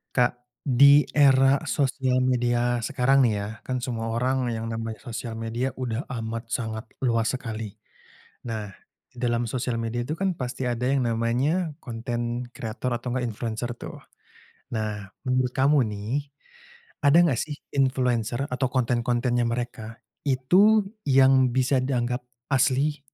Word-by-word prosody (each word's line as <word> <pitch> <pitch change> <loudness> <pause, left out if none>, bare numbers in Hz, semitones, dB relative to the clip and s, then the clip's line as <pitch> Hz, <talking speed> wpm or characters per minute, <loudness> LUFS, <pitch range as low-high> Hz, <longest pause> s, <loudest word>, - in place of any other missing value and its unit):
Kak, 125 -1 +4 0.3
di 140 +2 +7
era 135 -1 +5
sosial 130 -2 +1
media 120 -1 +1
sekarang 135 +2 +2
nih 115 -3 +3
ya, 100 - -3 0.2
kan 130 -1 -2
semua 115 -3 -3
orang 130 +1 0
yang 110 0 -4
namanya 115 -1 -4
sosial 115 -1 -5
media 115 +4 -2
udah 125 0 -3 0.2
amat 115 0 -4
sangat 110 -1 -3 0.2
luas 115 -3 +2
sekali. 110 -4 -6 0.7
Nah, 110 -3 -4 0.4
dalam 120 -1 0
sosial 125 -1 -2
media 115 +1 -2
itu 150 - -3
kan 190 -2 0
pasti 125 -2 -4
ada 120 0 -1
yang 135 -2 +2
namanya 125 +10 0
konten 120 0 -3
kreator 120 +1 -4
atau 120 +2 -6
enggak 125 -1 0
influencer 115 +1 -4
tuh. - - -8 0.8
Nah, 105 -2 -3 0.2
menurut 130 -1 +1
kamu 140 +3 +4
nih, 105 0 -6 1.0
ada 140 +2 +6
enggak 145 -9 +2
sih 150 -2 -6 0.2
influencer 125 -2 +1
atau 130 +1 0
konten-kontennya 120 -1 +1
mereka 115 -1 -4 0.3
itu 185 +12 +4 0.2
yang 130 -1 +5
bisa 130 +1 +3
dianggap 125 -1 -1 0.3
asli 135 +3 +2
125 Hz, 135 wpm, -25 LUFS, 115-135 Hz, 1.0 s, di